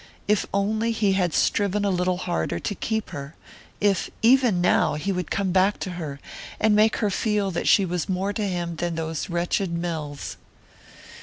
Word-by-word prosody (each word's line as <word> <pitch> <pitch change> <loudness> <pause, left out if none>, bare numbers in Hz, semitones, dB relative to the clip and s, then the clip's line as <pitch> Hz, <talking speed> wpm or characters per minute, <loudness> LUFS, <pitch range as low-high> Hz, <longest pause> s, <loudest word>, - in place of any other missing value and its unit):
If 210 -1 +2
only 215 +3 0
he 210 -3 +2
had 180 -3 +1
striven 205 +4 +1
a 200 - +2
little 180 0 +1
harder 80 - -2
to 145 - -3
keep 220 +1 -3
her 140 +2 -7 0.4
if, 200 -2 +1
even 240 -5 +5
now, 175 -4 +3
he 175 +7 -2
would 180 -3 -3
come 195 -2 0
back 190 +2 +3
to 185 - -3
her, 155 -6 -6 0.4
and 215 -1 +4
make 215 +1 +4
her 210 -3 0
feel 205 -1 0
that 170 - -2
she 195 - +5
was 175 -2 -3
more 190 +2 -1
to 210 -1 -1
him 175 -3 -3
than 175 0 -2
those 160 0 -3
wretched 175 +2 0
mills! 160 -4 -4
185 Hz, 180 wpm, -24 LUFS, 170-205 Hz, 0.4 s, even